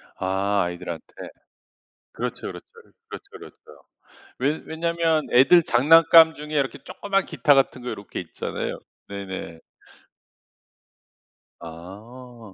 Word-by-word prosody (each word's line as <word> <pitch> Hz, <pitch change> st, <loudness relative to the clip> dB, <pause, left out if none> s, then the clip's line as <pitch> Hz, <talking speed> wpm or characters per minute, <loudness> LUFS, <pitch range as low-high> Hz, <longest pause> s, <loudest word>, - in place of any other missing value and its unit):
아 95 Hz, +1 st, 0 dB
아이들한테. 85 Hz, -2 st, -7 dB, 1.0 s
그렇죠, 125 Hz, 0 st, -5 dB
그렇죠. -, -, -9 dB, 0.4 s
그렇죠, -, -, -9 dB
그렇죠. 430 Hz, -1 st, -13 dB, 0.8 s
왜 145 Hz, +4 st, -1 dB
왜냐면 165 Hz, -1 st, -1 dB
애들 150 Hz, +7 st, +6 dB
장난감 160 Hz, +5 st, +6 dB
중에 150 Hz, 0 st, -9 dB
이렇게 140 Hz, -2 st, -1 dB
조그만 195 Hz, -1 st, -2 dB
기타 145 Hz, -1 st, +2 dB
같은 135 Hz, -2 st, +1 dB
거 125 Hz, -, -6 dB
요렇게 100 Hz, -, -7 dB
있잖아요. 85 Hz, -, -5 dB, 0.3 s
네네. 95 Hz, -4 st, -7 dB, 2.0 s
아. 105 Hz, +7 st, -12 dB
125 Hz, 240 characters per minute, -23 LUFS, 100-160 Hz, 2.0 s, 애들